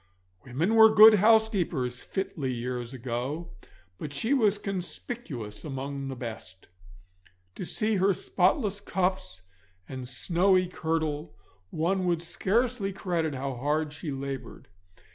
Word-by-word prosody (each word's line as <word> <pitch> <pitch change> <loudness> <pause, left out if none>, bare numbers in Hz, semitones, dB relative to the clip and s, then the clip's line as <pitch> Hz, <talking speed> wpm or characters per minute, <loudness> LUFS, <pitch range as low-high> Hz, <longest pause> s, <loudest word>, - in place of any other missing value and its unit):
Women 150 - -1
were 220 -1 +8
good 215 +1 +9
housekeepers 200 - +2
fitly 155 -8 -3
years 120 0 -4
ago, 130 +6 -4 0.5
but 150 - -5
she 220 - 0
was 215 -7 +3
conspicuous 180 - -5
among 140 -1 -5
the 135 - -5
best. 110 -7 -8 0.8
To 180 - -6
see 215 +2 0
her 190 +2 +3
spotless 200 - +1
cuffs 185 - -2 0.4
and 130 -1 -7
snowy 185 +8 +2
kirtle 160 - -3 0.3
one 180 - 0
would 170 -1 +1
scarce 230 +7 0
credit 170 -6 -1
how 135 +1 -3
hard 150 +4 -1
she 150 +1 -6
laboured. 135 -4 -6
165 Hz, 120 wpm, -28 LUFS, 130-195 Hz, 0.8 s, good